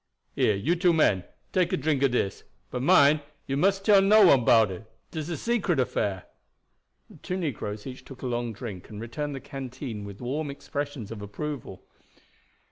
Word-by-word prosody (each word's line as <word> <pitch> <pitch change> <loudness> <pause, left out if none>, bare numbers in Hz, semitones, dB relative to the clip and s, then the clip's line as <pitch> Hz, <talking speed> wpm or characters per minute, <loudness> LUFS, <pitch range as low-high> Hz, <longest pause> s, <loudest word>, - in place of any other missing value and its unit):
Here, 105 - +2
you 140 - +1
two 175 0 +3
men, 105 - +3 0.3
take 180 -2 +2
a - - +1
drink 145 -1 0
of 140 - +4
dis; 120 -5 -1 0.3
but 125 - -3
mind, 150 -1 +5 0.2
you 135 - -2
mustn't 195 +6 +2
tell 205 -3 +7
no 205 +1 +7
one 135 -8 +6
'bout 110 -3 +5
it. 110 +4 -9 0.2
Dis 155 0 -4
a 170 - -2
secret 205 - 0
affair." 100 -6 -1 0.8
The - - -16
two 185 - -4
negroes 110 - -4
each 130 -1 -8
took 135 -1 -12
a - - -3
long 120 -1 -2
drink, 105 -5 -8
and 105 - -8
returned 140 +6 -4
the - - -5
canteen 130 -5 -7
with 100 -1 -9
warm 140 +5 -3
expressions 140 -5 -5
of 110 -2 -7
approval. 135 +7 -6
135 Hz, 185 wpm, -27 LUFS, 115-155 Hz, 0.8 s, tell